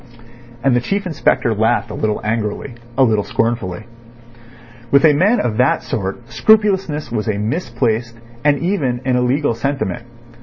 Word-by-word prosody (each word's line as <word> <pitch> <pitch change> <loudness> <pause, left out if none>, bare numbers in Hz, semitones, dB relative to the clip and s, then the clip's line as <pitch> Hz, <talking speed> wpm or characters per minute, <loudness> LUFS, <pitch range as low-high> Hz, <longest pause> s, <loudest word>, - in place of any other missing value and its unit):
And 135 -2 +3
the 120 - +2
Chief 200 +9 -2
Inspector 155 -8 +1
laughed 110 +1 +1
a - - -5
little 105 0 -1
angrily, 110 +3 -2 0.2
a 135 - +5
little 110 -4 +2
scornfully. 110 -5 -2 1.1
With 140 +4 +5
a 155 - +6
man 200 +11 +3
of 110 -3 -1
that 125 +2 +2
sort 105 +3 -4
scrupulousness 195 - +2
was 110 -2 -2
a 105 -2 0
misplaced 115 - -1 0.3
and 145 -1 +3
even 140 -8 -1
an 130 -1 +2
illegal 125 +2 +1
sentiment. 115 -4 -3
120 Hz, 150 wpm, -18 LUFS, 110-145 Hz, 1.1 s, a